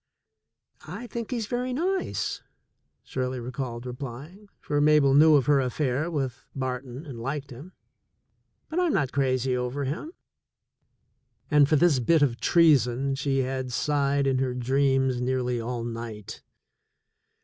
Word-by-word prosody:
"I 245 - -7
think 235 -1 -6
he's 235 -4 -2
very 250 +3 -2
nice," 370 +7 -2 0.6
Shirley 130 0 -3
recalled 125 -1 -5
replying, 140 - -8
for 145 0 -1
Mabel 150 -2 +5
knew 155 +2 +7
of 135 -4 +3
her 145 0 +4
affair 130 +4 -1
with 135 -6 -4
Barton 130 +1 -4
and 130 -6 -8
liked 140 +4 -4
him, 145 +10 -11 0.9
"but 320 - -2
I'm 355 -4 +2
not 145 -8 +1
crazy 130 -2 +1
over 125 +3 -2
him." 155 - -4 1.4
And 145 -1 +5
for 155 - +4
this 155 -3 +4
bit 150 +5 +3
of 120 -4 0
treason 140 -5 +3
she 135 -1 0
had 130 0 -3
sighed 140 +1 +1
in 135 -1 +1
her 130 -1 -1
dreams 130 0 +1
nearly 125 -1 -1
all 120 0 -4
night. 115 -3 -7
135 Hz, 140 wpm, -26 LUFS, 125-150 Hz, 1.4 s, knew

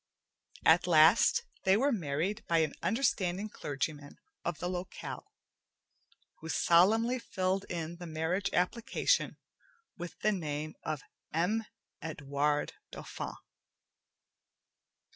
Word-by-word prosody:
At 170 +3 +6
last, 170 - +6 0.2
they 190 +1 +5
were 275 +5 +3
married 180 - -1
by 165 - +3
an 145 - -7
understanding 205 -5 0
clergyman 145 -4 -4 0.3
of 170 -2 -2
the 175 - -3
locale, 180 +1 -6 1.1
who 160 - -8
solemnly 220 +11 +4
filled 190 -3 -1
in 170 0 -4
the 175 0 -8
marriage 165 +5 -1
application 235 - +1 0.6
with 175 -1 -7
the 215 - +3
name 155 -5 -3
of 155 -3 -3 0.3
M. 205 +8 +1 0.4
Edwarde 145 -1 -1 0.2
Dauphin. - - -6
175 Hz, 105 wpm, -32 LUFS, 155-200 Hz, 1.1 s, At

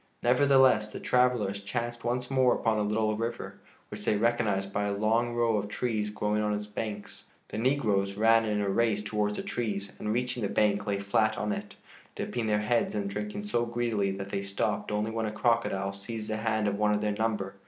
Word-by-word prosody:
Nevertheless, 130 -4 +4
the - - -6
travelers 120 -6 +1
chanced 120 +3 -4
once 125 +2 -2
more 130 -2 +4
upon 110 -2 +1
a - - +1
little 110 +1 +1
river, 115 +2 -4 0.3
which - - -8
they 105 - +2
recognized 105 -4 0
by 105 0 0
a 100 - 0
long 115 +3 +1
row 115 -2 +2
of 105 0 -2
trees 105 -1 -1
growing 105 0 -1
on 105 0 0
its 105 0 -4
banks. 105 0 -6 0.2
The 105 - -4
negroes 105 -7 +1
ran 115 +2 +5
in 105 -1 0
a 100 - -1
race 105 0 +1
towards 105 -1 -1
the - - -4
trees 100 -4 -3
and, 105 - -2
reaching 125 +1 -1
the 100 - -1
bank, 105 -1 +1
lay 100 -1 0
flat 110 +3 +1
on 105 -2 -1
it, - - -5 0.4
dipping 120 -2 -3
their 105 -1 +2
heads 120 - +1
and 200 -1 -2
drinking 210 0 -4
so 120 -13 0
greedily 115 -4 0
that 95 0 -6
they 100 - -2
stopped 100 +1 -2
only 105 +1 -1
when 110 -1 -1
a - - -3
crocodile 105 -4 0
seized 110 +2 -6
the 110 - -1
hand 110 -1 0
of 100 0 -1
one 105 0 +3
of 105 - -1
their 105 0 0
number. 105 -3 -1
110 Hz, 210 wpm, -29 LUFS, 105-120 Hz, 0.4 s, ran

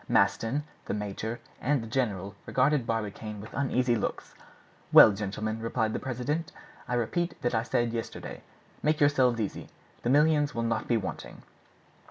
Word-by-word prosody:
Maston, 130 +6 +2 0.2
the - - -2
major, 105 +3 -4 0.2
and 140 -3 +1
the - - -7
general 100 -6 -1
regarded 130 -1 +2
Barbicane 105 -1 -3
with 105 - -10
uneasy 125 -2 +1
looks. 110 - -3 0.6
"Well, - - +10
gentlemen," 105 +2 -3
replied 115 -1 -1
the - - -1
president, 140 +6 -2 0.4
"I 125 - -1
repeat 170 +9 -1
what 120 - 0
I 110 - +2
said 115 0 0
yesterday. 115 -1 -5 0.4
Make 155 +1 +2
yourselves 130 -5 +3
easy; 105 -3 -4 0.3
the 120 - -1
millions 150 +1 +3
will 115 - -1
not 115 0 -1
be 120 - +3
wanting." 100 - -6
120 Hz, 155 wpm, -29 LUFS, 110-135 Hz, 0.6 s, Well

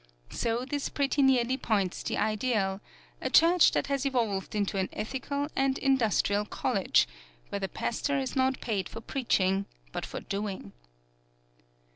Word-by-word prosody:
So 235 +2 -1
this 285 +1 -2
pretty 280 0 +1
nearly 260 -1 +3
points 200 -8 0
the - - -2
ideal 215 -3 0 0.4
a - - -1
church 340 +1 +6
that - - +1
has 280 -1 -1
evolved 230 -8 -1
into 200 -1 0
an 190 - -1
ethical 280 +5 -3
and 270 0 +2
industrial 225 -6 +2
college, 210 - +1 0.4
where 200 - -3
the 195 -1 -3
pastor 280 +4 -1
is 265 -1 -2
not 260 0 +1
paid 200 -6 -2
for - - -7
preaching, 195 -6 0 0.2
but - - -4
for - - -5
doing. 195 - -4
235 Hz, 145 wpm, -29 LUFS, 200-270 Hz, 0.4 s, church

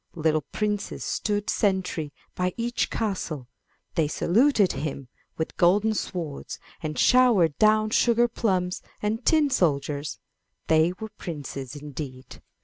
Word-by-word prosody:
Little 155 -1 +1
princes 210 -1 -2
stood 205 -1 -1
sentry 185 -7 0 0.2
by 180 0 -1
each 240 +1 -1
castle; 175 - -3 0.5
they 160 -2 +2
saluted 210 - +3 0.6
with 160 - -3
golden 205 +5 +4
swords 170 -8 -4 0.2
and 155 -2 -4
showered 230 - +5
down 215 0 +4
sugar 235 +1 +4
plums 185 -6 -1 0.2
and 220 +3 -1
tin 305 -1 +3
soldiers; 150 - 0 0.5
they 160 +2 +4
were 220 - -5
princes 140 -5 -6
indeed. 140 -3 -8
180 Hz, 115 wpm, -26 LUFS, 155-215 Hz, 0.6 s, showered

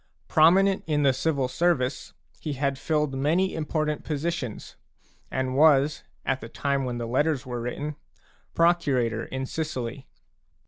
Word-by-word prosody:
Prominent 190 +5 +4
in 150 -2 +1
the 135 -1 +4
civil 140 -1 0
service, 140 -2 0 0.3
he 150 - -4
had 140 0 -1
filled 150 -3 0
many 160 +8 +1
important 155 -1 -2
positions 150 -6 -4 0.5
and 130 -1 -2
was, 145 0 +4 0.2
at 135 0 0
the 115 - -8
time 140 +1 -1
when 125 -1 -3
the 120 - -3
Letters 135 +3 0
were 120 -2 -4
written, 145 +5 -4 0.6
procurator 140 -10 +2
in 130 0 -4
Sicily. 135 -4 -4
140 Hz, 135 wpm, -26 LUFS, 130-155 Hz, 0.6 s, Prominent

